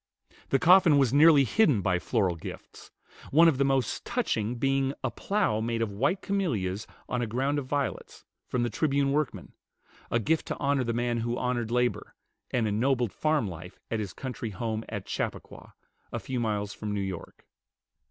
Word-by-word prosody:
The 135 - +3
coffin 175 0 +6
was 135 -3 +3
nearly 150 -1 +7
hidden 140 - +3
by 90 -1 +1
floral 95 -4 0
gifts; 80 - -10 0.4
one 165 +4 +6
of 145 -5 +2
the - - +4
most 135 -4 0
touching 110 +3 -1
being 135 +2 0
a 130 - 0
plow 195 - 0
made 115 0 -1
of 110 - -3
white 180 - 0
camelias 110 - -1 0.2
on 125 - -1
a 120 - -1
ground 135 +6 0
of 135 - -7
violets, 140 0 -3 0.2
from 125 -1 -1
the 120 - -1
"Tribune" 140 -1 +1
workmen, 150 -2 -2 0.6
a - - +2
gift 155 +8 0
to - - -3
honor 140 -2 +1
the 120 - -1
man 120 0 0
who 120 +1 -2
honored 120 -2 -1
labor, 125 +1 -1 0.3
and 115 -3 0
ennobled 120 +2 +1
farm 155 -7 +1
life 90 0 -9
at 115 - 0
his 105 -3 -4
country 125 -3 -5
home 110 +2 -3
at 105 -4 -5
Chappaqua, - - -5 0.4
a - - -3
few 130 -2 -4
miles 105 -3 -1
from 105 0 -4
New - - -1
York. 95 -3 -7
125 Hz, 180 wpm, -28 LUFS, 110-140 Hz, 0.6 s, nearly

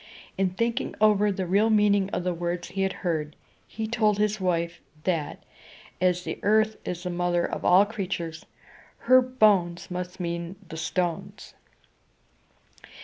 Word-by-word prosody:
In 190 -1 +1
thinking 230 +6 -2
over 210 -1 +4
the 190 -1 -3
real 200 +5 +3
meaning 205 -2 +3
of 180 - -3
the 180 0 0
words 175 +1 -3
he 195 +2 -3
had 190 0 +1
heard, 155 -3 -1 0.3
he 220 +1 -5
told 215 -2 +1
his 210 0 0
wife, 170 -2 -1 0.2
that, 165 -5 -2 0.6
as 180 -1 +2
the - - -5
Earth 215 +1 +3
is 180 0 -5
the 180 - -3
mother 175 0 0
of - - -4
all 185 +3 +6
creatures, 180 -6 -5 0.5
her 255 0 +6
bones 205 -10 +2
must 180 +1 -5
mean 170 +1 -4
the 160 - -8
stones. 170 +1 -3
185 Hz, 145 wpm, -26 LUFS, 175-210 Hz, 0.6 s, all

